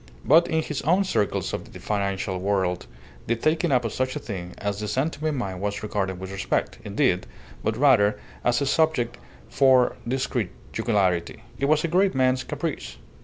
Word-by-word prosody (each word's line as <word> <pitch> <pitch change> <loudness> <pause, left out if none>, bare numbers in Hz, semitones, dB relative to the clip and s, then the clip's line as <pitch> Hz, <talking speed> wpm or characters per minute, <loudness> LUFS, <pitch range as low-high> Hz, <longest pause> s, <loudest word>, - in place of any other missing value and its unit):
But 165 +4 +6
in 160 -1 +1
his 150 -3 -3
own 180 +6 +3
circles 105 - -1
of - - -6
the - - -9
financial 100 -2 -2
world 95 -5 0 0.4
the 115 - +2
taking 155 +6 +1
up 125 -2 +3
of 115 - -2
such 130 +1 -1
a - - -2
thing 90 -9 -6
as 100 0 -3
the 105 - -3
San 135 +9 0
Tome 155 0 -2
mine 95 -7 -3
was 100 +1 -3
regarded 95 -3 -2
with 95 0 -7
respect, 95 0 -2
indeed, - - +1 0.4
but 110 - 0
rather 105 -7 +4 0.2
as 120 +3 +2
a - - +1
subject 135 -5 +1 0.3
for 130 -2 +4
discreet 125 -5 -1 0.2
jocularity. 95 -2 0 0.2
It 140 - +1
was 150 +1 +3
a - - +1
great 185 +2 +2
man's 130 0 +2
caprice. - - -4
120 Hz, 180 wpm, -25 LUFS, 100-145 Hz, 0.4 s, But